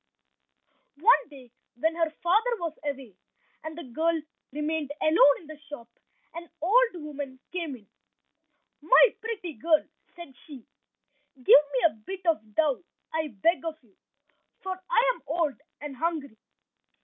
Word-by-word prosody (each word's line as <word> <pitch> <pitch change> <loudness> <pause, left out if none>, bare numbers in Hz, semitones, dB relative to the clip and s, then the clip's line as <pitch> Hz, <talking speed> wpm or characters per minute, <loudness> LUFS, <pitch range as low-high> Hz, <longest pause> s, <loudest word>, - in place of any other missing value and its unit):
One 465 +9 +4
day 260 -5 -14 0.2
when 320 +7 0
her 330 -1 +1
father 440 +8 +3
was 335 -4 -3
away, 270 -7 -5 0.5
and 315 0 -7
the 340 - -6
girl 320 +6 0 0.3
remained 300 +1 -2
alone 310 -2 +5
in - - -16
the 310 -1 -11
shop, 240 -6 -8 0.5
an 335 0 -8
old 450 +5 +3
woman 290 -5 -7
came 335 -6 -4
in— 220 -4 -16 1.0
"My - - +6
pretty 430 -7 -5
girl," 310 +6 +2 0.3
said 345 -6 -11
she, 275 -7 -11 0.7
"give 255 -2 -21
me 285 -3 +6
a - - +4
bit 365 - -9
of 220 -11 0
dough 305 -1 +1 0.3
I 315 -1 0
beg 300 - +1
of 325 -1 -3
you, 210 -5 -28 0.7
for 375 -1 -4
I - - +4
am - - -17
old 315 -5 -1 0.2
and 290 -2 -6
hungry." 295 -8 -3
315 Hz, 145 wpm, -27 LUFS, 275-345 Hz, 1.0 s, My